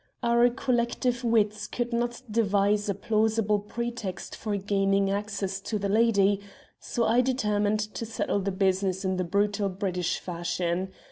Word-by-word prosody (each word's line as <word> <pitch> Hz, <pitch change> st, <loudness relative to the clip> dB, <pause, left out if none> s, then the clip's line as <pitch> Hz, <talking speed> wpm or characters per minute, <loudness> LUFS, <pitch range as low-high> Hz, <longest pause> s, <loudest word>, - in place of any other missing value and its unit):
Our 235 Hz, +1 st, +4 dB
collective 245 Hz, 0 st, 0 dB
wits 215 Hz, -3 st, +1 dB
could 240 Hz, 0 st, -3 dB
not 240 Hz, +1 st, -1 dB
devise 205 Hz, -1 st, +2 dB
a 200 Hz, -, 0 dB
plausible 215 Hz, 0 st, +1 dB
pretext 230 Hz, -2 st, -5 dB
for 210 Hz, -2 st, -2 dB
gaining 195 Hz, 0 st, +1 dB
access 200 Hz, -1 st, -2 dB
to 215 Hz, -, -2 dB
the 200 Hz, -1 st, -2 dB
lady, 205 Hz, -2 st, +3 dB, 0.4 s
so 235 Hz, -, -1 dB
I 235 Hz, +3 st, +4 dB
determined 210 Hz, -5 st, +1 dB
to 230 Hz, -, -4 dB
settle 220 Hz, -2 st, -1 dB
the 200 Hz, 0 st, -1 dB
business 190 Hz, 0 st, 0 dB
in 185 Hz, 0 st, 0 dB
the 185 Hz, -, 0 dB
brutal 200 Hz, +2 st, +1 dB
British 185 Hz, -2 st, -1 dB
fashion. 175 Hz, +1 st, -2 dB
205 Hz, 145 wpm, -27 LUFS, 195-230 Hz, 0.4 s, Our